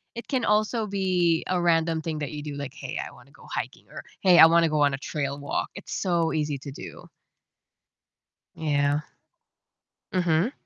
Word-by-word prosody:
it 235 - -7
can 255 -4 0
also 215 +2 +2
be 185 -4 +1
a 185 -1 +1
random 165 -1 +2
thing 160 -1 -4
that 145 -2 -3
you 150 -1 -6
do, 150 -1 -5
like, 140 -2 -5
"Hey, - - -6
I - - -8
wanna - - -18
go - - -17
hiking," - - -5
or, - - -9 0.2
"Hey, 180 -3 +6
I 160 - +11
wanna 165 0 +4
go 155 -1 +1
on 145 -1 +3
a - - -1
trail 140 -1 -3
walk." 145 - -2
It's 190 - -10
so 170 -3 0
easy 150 -3 -1
to 140 0 -8
do. 135 - -10 1.5
Yeah. 145 -1 +1 1.1
Mhm. 180 +4 +2
165 Hz, 180 wpm, -26 LUFS, 145-185 Hz, 1.5 s, I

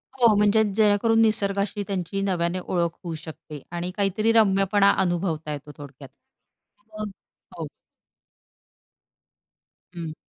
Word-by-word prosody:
हो, 235 -4 +5
म्हणजे 210 +1 +4
जेणेकरून 220 +1 +3
निसर्गाशी 205 -1 +1
त्यांची 195 0 -3
नव्याने 180 -2 -1
ओळख 175 -1 -1
होऊ 170 -2 -4
शकते, 155 -2 -10
आणि 175 +1 -4
काहीतरी 205 +2 +1
रम्यपणा 200 -2 +4
अनुभवता 175 -4 -1
येतो. 150 +1 -8
थोडक्यात, 140 -1 -11 0.9
मग 215 0 -3 0.5
हो. - - -4 2.3
हं. 165 -3 -6
195 Hz, 105 wpm, -24 LUFS, 170-205 Hz, 2.3 s, हो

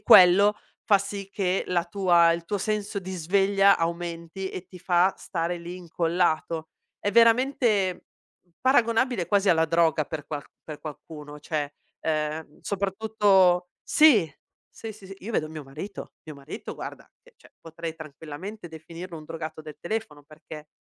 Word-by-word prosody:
quello 195 +3 +7 0.3
fa 200 -3 +5
sì 200 0 -6
che 190 -2 0
la 175 -2 +1
tua 175 -3 +4
il 170 0 -1
tuo 205 +4 -2
senso 210 0 -2
di 190 0 -7
sveglia 195 +3 +3
aumenti 170 +2 -3
e 180 0 -7
ti 180 - -12
fa 180 +1 +3
stare 170 0 -3
lì 170 +1 -7
incollato. 165 -2 -1 0.3
È 205 - 0
veramente 230 -4 +3 0.6
paragonabile 240 -5 +2
quasi 200 +2 +2
alla 160 -2 +5
droga 165 -2 +2
per 155 -1 -6
qual 145 -2 -5 0.2
per 155 -2 -8
qualcuno, 150 -1 -9
cioè, 150 -1 -3 0.3
ehm, 155 -1 -2
soprattutto 195 -3 +2
sì, 230 - +5 0.4
sì, 220 -1 -8
sì, 200 -2 -14
s 195 - -8
io 225 +5 -7
vedo 155 -6 0
mio 155 -2 -8
marito, 155 +9 -8
mio 155 -2 -10
marito 140 - -8
guarda - - -7 0.2
che, - - -22
cioè, - - -20
potrei 165 0 -7
tranquillamente 160 +6 -8
definirlo 165 +2 -9
un 155 - -10
drogato 160 0 -6
del 155 -1 -10
telefono, 215 -7 -4
perché 155 0 -12
175 Hz, 150 wpm, -26 LUFS, 160-200 Hz, 0.6 s, quello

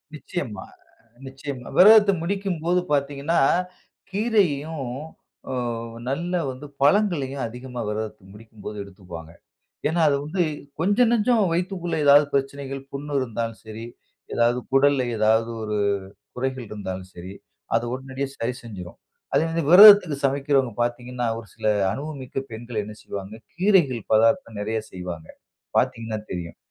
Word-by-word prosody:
நிச்சியமா, 140 - -5 0.6
நிச்சியமா. 135 -1 -7
விரதத்த 210 +1 +8
முடிக்கும்போது 180 -2 0
பார்த்தீங்கன்னா, 140 +3 0 0.7
கீரையையும் 165 - 0 0.6
அ - - -2 0.6
நல்ல 170 +6 -2 0.2
வந்து 130 +3 -9 0.2
பழங்களையும் 145 -5 +2
அதிகமா 125 +1 -7
விரதத்த 110 0 -4
முடிக்கும் 110 0 -15
போது 105 - -5
எடுத்துக்குவாங்க. 90 -4 -11 0.6
ஏன்னா 165 +2 0
அது 140 - +2
வந்து 175 +4 0 0.4
கொஞ்சம், 205 +7 +3
நஞ்சம் 235 0 +3
வயித்துக்குள்ள 175 0 -2
ஏதாவது 145 +1 +7
பிரச்சனைகள் 135 0 -2
புண் 140 +1 -6
இருந்தாலும் 115 -3 -3
சரி 110 +1 -8 0.5
எதாவது 120 +1 +2
குடல்ல 135 0 +4 0.2
ஏதாவது 110 +2 +3
ஒரு 105 -1 -2 0.6
குறைகள் 130 0 -3
இருந்தாலும் 95 -3 -6
சரி, 90 +2 -8 0.4
அத 115 +1 +1
உடனடியா 135 +1 -4
சரி 120 +2 -2
செஞ்சுரும். 95 -7 -9 0.4
அதே 160 - +4 0.3
விரதத்துக்கு 195 -5 +9
சமைக்கிறவங்க 135 -2 +1
பார்த்தீங்கன்னா 120 +1 -2
ஒரு 115 - -9
சில - - -5 0.3
அனுபவமிக்க 140 -3 -6
பெண்கள் 115 -1 -4
என்ன 105 +1 -8
செய்வாங்க 100 +1 -7 0.2
கீரைகள் 175 - +3
பதார்த்தம் 115 - +3
நெறைய 110 +2 -1
செய்வாங்க. 90 -3 -7 0.5
பார்த்தீங்கன்னா 115 -1 -1
தெரியும். 85 -2 -6
130 Hz, 120 wpm, -24 LUFS, 110-160 Hz, 0.7 s, விரதத்துக்கு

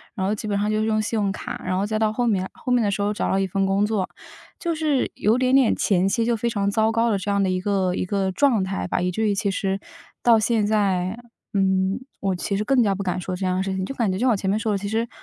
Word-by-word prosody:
然 190 -4 -2
后 200 - +1
基 215 0 -5
本 205 -1 0
上 205 +1 0
就 215 0 +1
用 215 0 +1
信 220 +1 -1
用 200 -2 +1
卡， - - -6
然 185 0 -1
后 195 - 0
再 215 +1 -1
到 215 -1 +2
后 245 +2 -1
面 190 -5 0
后 250 - -5
面 245 -2 +3
的 205 - +1
时 200 - -2
候 205 +1 0
找 - - -2
到 - - -1
了 195 - +2
一 195 - 0
份 195 +1 0
工 195 +2 +2
作， 210 -3 -1 0.5
就 340 -1 -1
是 305 -4 0
有 220 +4 +2
点 255 0 +1
点 265 -3 +5
前 190 -2 +2
期 225 +4 +1
就 235 0 +2
非 235 +2 -1
常 200 -3 0
糟 220 +1 +2
糕 230 +1 +2
的， 200 - +1
这 195 - -4
样 200 0 +2
的 190 - +1
一 185 - 0
个 190 -2 0
一 - - -1
个 190 0 -1
状 240 -2 +2
态 190 +1 -3
吧。 - - -1
以 180 0 0
至 220 +4 0
于 205 - +1
其 200 0 0
实 195 0 -1 0.4
到 230 -2 +6
现 215 0 +1
在 200 -1 0 0.3
嗯， 190 0 +1 0.2
我 195 -2 0
其 195 +3 -2
实 210 - -1
更 255 +3 +3
加 200 -3 +2
不 200 - -4
敢 185 -1 -1
说 185 +1 -4
这 190 +1 -3
样 185 0 0
的 190 - 0
事 190 -1 -2
情， 190 0 -2
就 270 - -5
感 225 -7 +1
觉 185 - -2
就 - - -5
像 255 -1 +4
我 - - +3
前 190 -1 -2
面 205 - +2
说 220 0 -1
的， 205 - +1
其 200 +1 -5
实 225 +2 -1
205 Hz, 335 characters per minute, -23 LUFS, 190-220 Hz, 0.5 s, 到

